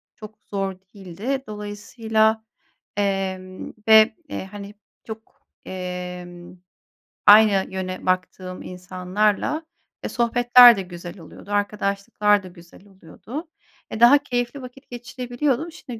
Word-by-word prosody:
çok 215 Hz, 0 st, -12 dB
zor 195 Hz, -1 st, -3 dB, 0.2 s
değildi. 205 Hz, +8 st, -5 dB
Dolayısıyla, 220 Hz, +1 st, -1 dB, 0.5 s
emm, 190 Hz, -2 st, -3 dB
ve, 220 Hz, 0 st, +7 dB
eee, -, -, -5 dB
hani, 205 Hz, 0 st, -9 dB, 0.3 s
çok, 220 Hz, 0 st, -11 dB, 0.2 s
emm, 180 Hz, -1 st, -7 dB, 0.7 s
aynı 205 Hz, -2 st, +7 dB
yöne 185 Hz, -1 st, -5 dB
baktığım 185 Hz, 0 st, -2 dB
insanlarla, 185 Hz, -, -2 dB, 0.4 s
e, -, -, -3 dB
sohbetler 240 Hz, 0 st, +6 dB
de -, -, -2 dB
güzel 175 Hz, 0 st, -9 dB
oluyordu, 180 Hz, +5 st, -13 dB
arkadaşlıklar 205 Hz, 0 st, 0 dB
da -, -, -9 dB
güzel 175 Hz, +2 st, -17 dB
oluyordu. 210 Hz, -, -10 dB, 0.4 s
E, 220 Hz, -, -6 dB
daha 240 Hz, +5 st, +8 dB
keyifli 245 Hz, 0 st, -3 dB
vakit 255 Hz, +2 st, -13 dB
geçirebiliyordum. 245 Hz, +5 st, -3 dB
Şimdi 245 Hz, -8 st, -10 dB
205 Hz, 110 wpm, -22 LUFS, 185-235 Hz, 0.7 s, daha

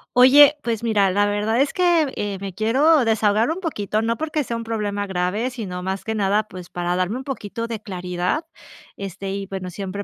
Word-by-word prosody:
Oye, 280 Hz, +4 st, +8 dB
pues 230 Hz, -1 st, -2 dB
mira, 210 Hz, -4 st, +3 dB
la 205 Hz, +2 st, +2 dB
verdad 210 Hz, +4 st, +1 dB
es 275 Hz, 0 st, +1 dB
que, 345 Hz, -6 st, +2 dB
eh, 205 Hz, -1 st, -2 dB
me 195 Hz, -1 st, -5 dB
quiero 260 Hz, -, +3 dB
desahogar 220 Hz, +1 st, +2 dB
un 335 Hz, +4 st, -3 dB
poquito, 215 Hz, -, -2 dB
no 230 Hz, +1 st, -1 dB
porque 305 Hz, -1 st, -1 dB
sea 235 Hz, -2 st, -4 dB
un 230 Hz, -, -6 dB
problema 205 Hz, -2 st, -2 dB
grave, 190 Hz, +6 st, -1 dB
sino 190 Hz, -7 st, -6 dB
más 190 Hz, +1 st, -3 dB
que 220 Hz, -, -3 dB
nada, 205 Hz, +1 st, +2 dB
pues 180 Hz, -2 st, -10 dB
para 175 Hz, 0 st, -2 dB
darme 185 Hz, +4 st, 0 dB
un 260 Hz, -, -5 dB
poquito 230 Hz, -4 st, -5 dB
de 225 Hz, -3 st, -5 dB
claridad. 180 Hz, -, -2 dB, 0.5 s
Este, 195 Hz, 0 st, -5 dB
y 195 Hz, 0 st, -4 dB
bueno, 190 Hz, -1 st, -6 dB
siempre 195 Hz, +2 st, -5 dB
210 Hz, 205 wpm, -22 LUFS, 195-245 Hz, 0.5 s, Oye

